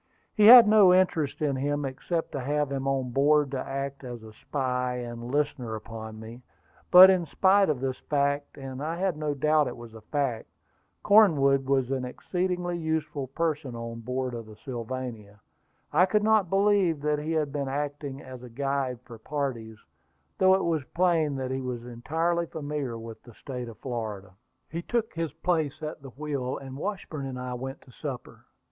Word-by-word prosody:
He 210 -1 +5
had 240 -1 +11
no 210 -3 +7
interest 170 -6 +2
in 140 -2 +1
him, 145 +2 -1
except 160 +5 -3
to 140 - -4
have 145 +2 -1
him 135 0 -2
on 135 -2 -1
board 145 +2 +3
to 135 - -2
act 140 +1 -4
as 120 -3 -7
a 110 -1 -12
spy 125 0 -2
and 120 -1 -6
listener 135 -5 -1
upon 110 0 -8
me. 115 +3 -10 0.5
But 185 +1 +10
in 180 -3 0
spite 195 +4 +4
of 140 -5 -1
this 130 -1 -2
fact 145 0 0
and 135 -1 -7
I 160 +3 -2
had 185 -2 0
no 150 -1 -2
doubt 150 +1 +3
it 125 - -6
was 120 -1 -11
a 110 - -11
fact 130 -1 -2 0.6
Cornwood 140 -11 +5
was 135 -2 +1
an 130 -1 -1
exceedingly 175 +6 -2
useful 155 -4 -2
person 145 -3 -2
on 115 0 -6
board 125 +2 -3
of 115 -2 -6
the 110 - -12
Sylvania. 120 -4 -6 0.5
I 180 - +5
could 210 +2 +2
not 215 -4 +3
believe 195 -4 +3
that 150 0 0
he 155 +2 -3
had 155 -3 0
been 140 -2 -2
acting 145 0 -4
as 130 -1 -10
a 125 - -10
guide 135 -1 -2
for 115 -3 -11
parties, 120 -5 -4 0.6
though 190 0 +6
it 190 - 0
was 165 -4 0
plain 165 -5 +2
that 130 -1 -3
he 130 0 -2
was 125 -2 -5
entirely 165 +8 -1
familiar 145 -6 -4
with 115 0 -9
the 120 -3 -16
State 125 -3 -6
of 115 - -12
Florida. 110 -6 -5 0.4
The 165 +2 -3
pilot - - -29
took 235 -2 0
his 165 -3 -3
place 160 -2 -1
at 155 -1 -5
the 135 - -10
wheel, 140 -2 -4
and 135 -1 -9
Washburn 155 -4 -4
and 130 -1 -6
I 125 0 -4
went 135 +3 -6
to 130 - -18
supper. 130 -1 -8
140 Hz, 190 wpm, -27 LUFS, 125-160 Hz, 0.6 s, had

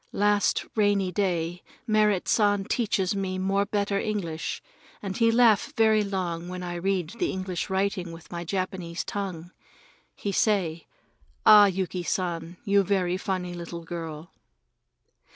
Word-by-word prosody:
Last 205 0 +2
rainy 205 -3 +2
day 175 -2 -1 0.2
Merrit 215 -4 +2
San 205 -2 +3
teached 205 -5 0
me 190 -1 -2
more 195 +2 +1
better 200 -1 0
English, 175 -8 -3 0.4
and 195 -2 -5
he 230 +1 +3
laugh 230 -3 +4
very 220 -1 +4
long 180 -4 -3
when 180 0 -5
I 175 -1 -4
read 180 -1 -1
the 350 - +1
English 185 -2 -3
writing 190 -2 -1
with 165 0 -12
my 170 -1 -4
Japanese 185 -1 -3
tongue. 180 -4 -5 0.6
He 200 - -3
say: 180 -6 +1 0.6
"Ah, 210 -1 +9
Yuki 185 -1 -2
San, 175 0 -3
you 200 0 +4
very 185 -2 +1
funny 185 -2 -3
little 170 -1 -7
girl!" 165 -1 -7
190 Hz, 135 wpm, -26 LUFS, 175-205 Hz, 0.6 s, Ah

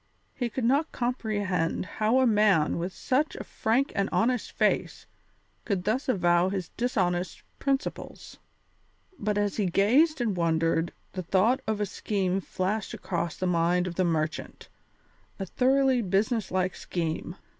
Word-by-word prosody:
He 245 -2 -2
could 250 +3 -4
not 280 +7 +2
comprehend 205 -10 -1
how 215 +7 +1
a - - +4
man 210 -9 +3
with 175 +3 -3
such 270 - 0
a - - -6
frank 245 +6 0
and 200 0 0
honest 245 0 +1
face - - 0 0.6
could 195 -4 -1
thus 250 +7 -1
avow 175 -4 +3
his 190 -3 -3
dishonest 185 -7 -1 0.2
principles. 275 0 -3 0.8
But 210 0 -1
as 205 -1 0
he 205 -3 +1
gazed 260 - +3
and 225 -5 0
wondered 165 0 +1 0.2
the 185 - -3
thought 195 +9 +2
of 220 -1 -1
a 210 - +1
scheme 195 -1 -1
flashed 190 +3 -2
across 170 -2 -3
the 185 - -2
mind 175 0 +2
of 180 - -4
the 185 - +1
merchant, 160 -2 -2 0.7
a 195 - -4
thoroughly 260 +4 +2
business 210 +2 0
like 185 0 0
scheme. 165 0 -4
200 Hz, 145 wpm, -27 LUFS, 180-240 Hz, 0.8 s, a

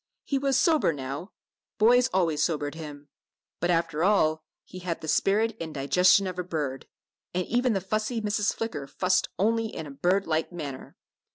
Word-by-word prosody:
He 275 - -1
was 275 -1 +1
sober 315 - +3
now 140 +5 -6 0.5
boys 245 +3 +5
always 165 -5 +1
sobered 145 -3 0
him. 150 -3 -9 0.5
But 175 - 0
after 165 -2 +1
all, 160 -6 +3 0.2
he 185 - -10
had 175 -2 -3
the 160 - -7
spirit 210 +7 +2
and 160 -2 -6
digestion 180 +8 +4
of 180 -1 -4
a - - -1
bird, 150 -7 -4 0.5
and 180 0 0
even 245 0 +1
the 195 - -1
fussy 215 +5 -1
Mrs. 210 -1 0
Flicker 185 -12 -4
fussed 185 +5 +1
only 225 +3 +1
in 160 -7 -7
a 145 - -8
bird 185 +7 +1
like 160 +1 -1
manner. 145 -6 -7
180 Hz, 175 wpm, -27 LUFS, 155-215 Hz, 0.5 s, boys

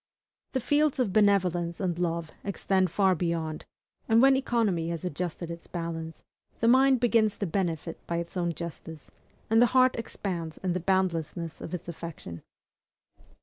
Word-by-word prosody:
The 260 - +1
fields 290 +3 +2
of 240 -8 0
benevolence 180 -5 +2
and 175 -3 -1
love 170 -2 -1
extend 190 -1 +1
far 190 +2 +3
beyond; 165 -2 -2 0.4
and 225 +1 +5
when 270 +2 +6
economy 225 -11 0
has 170 0 -4
adjusted 175 0 -4
its 170 0 -9
balance, 165 -2 -5 0.3
the 230 - +2
mind 260 +1 +5
begins 225 -3 +2
to 205 - -2
benefit 165 -3 -2
by 170 - -1
its 170 +1 -5
own 175 -2 0
justice, 160 -1 -8 0.4
and 225 +1 +4
the 245 - +7
heart 255 0 +5
expands 175 -8 -4
in 180 -2 0
the 180 - -1
boundlessness 170 -3 -1
of 170 - -4
its 175 - -8
affection. 160 - -7
180 Hz, 155 wpm, -28 LUFS, 165-215 Hz, 0.4 s, the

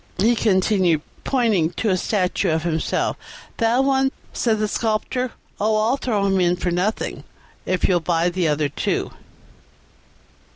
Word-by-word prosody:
he 220 +6 +3
continued, 190 -6 +2 0.2
pointing 220 -11 +2
to 210 +4 -1
a - - +3
statue 185 0 0
of 160 0 0
himself. 160 -2 -1 0.4
"That 235 +3 +2
one?" 270 0 +2 0.2
said 225 -3 +1
the 215 0 0
Sculptor; 230 +4 -1 0.3
"Oh, 215 +1 +2
I'll 225 +5 +2
throw 215 -7 0
him 195 -1 +2
in 175 -1 +3
for 180 0 -2
nothing 185 +5 -2 0.4
if 185 -1 +1
you'll 180 -2 +3
buy 170 +1 +1
the 175 -1 0
other 150 0 +1
two." 140 - -2
195 Hz, 150 wpm, -22 LUFS, 175-225 Hz, 0.4 s, he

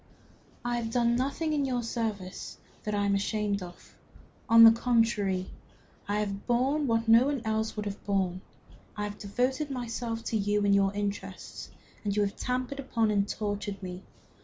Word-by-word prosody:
"I 240 0 0
have 230 -1 -2
done 235 0 +2
nothing 280 +5 -1
in 290 -2 +1
your 250 -3 -1
service 215 -5 -4 0.3
that 210 -1 -1
I 205 0 +1
am 200 - +2
ashamed 205 0 0
of. 175 -1 -11 0.5
On 230 0 +9
the 225 - +11
contrary, 225 -5 +1 0.6
I 205 +1 0
have 200 -1 -4
borne 270 +5 +2
what 225 -1 +1
no 230 +4 +7
one 280 -4 -1
else 220 0 -1
would 210 -1 -3
have 205 0 -5
borne. 190 -2 0 0.6
I 210 - -2
have 205 0 -5
devoted 255 +8 -1
myself 235 -3 -3
to 225 - -1
you 205 0 +1
and 200 - +4
your 195 -1 +4
interests, 200 -2 -5 0.3
and 200 -1 -1
you 210 - +3
have 200 0 -2
trampled 255 +2 -2
upon 230 -5 +1
and 200 -1 +1
tortured 205 -2 -3
me. 180 0 -6
220 Hz, 175 wpm, -29 LUFS, 200-240 Hz, 0.6 s, the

